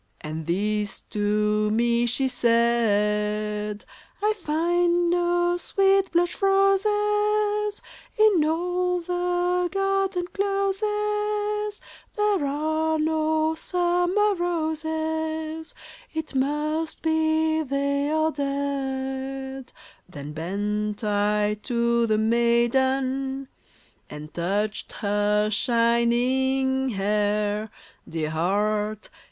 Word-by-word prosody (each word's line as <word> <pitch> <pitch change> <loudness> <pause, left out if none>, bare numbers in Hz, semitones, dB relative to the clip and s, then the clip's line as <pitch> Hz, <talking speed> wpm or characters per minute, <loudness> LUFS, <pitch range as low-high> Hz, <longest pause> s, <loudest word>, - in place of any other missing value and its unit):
And 155 +1 -6
this 205 +3 -1
to 210 0 +1
me 235 +2 +2
she 265 +3 +1
said: 210 -3 +1 0.2
*' - - -31
I 425 +1 +3
find 345 -1 +1
no 350 0 +1
sweet 390 +1 +2
blush 350 +2 0
roses 415 +1 +2 0.3
In 425 -7 +5
all 355 +3 0
the 355 0 0
garden 390 -2 0
closes: 420 +1 -1 0.4
There 415 -8 +1
are 315 +2 0
no 315 0 +1
summer 355 +5 +1
roses; 320 -2 -3 0.4
It 315 -2 -4
must 300 +4 -1
be 315 0 +2
they 280 0 -1
are 315 +1 +1
dead 270 -2 -3
I - - -26 0.2
" - - -35
Then 145 -3 -8
bent 205 +6 -2
I 210 0 +1
to 235 -1 +1
the 215 -1 +2
maiden 260 +4 +1 0.6
And 150 +1 -9
touched 200 +5 -2
her 210 0 +1
shining 250 +3 +2
hair 210 0 0 0.2
— - - -22
Dear 155 -2 -3
heart 210 +5 -1
280 Hz, 90 wpm, -25 LUFS, 215-350 Hz, 0.6 s, In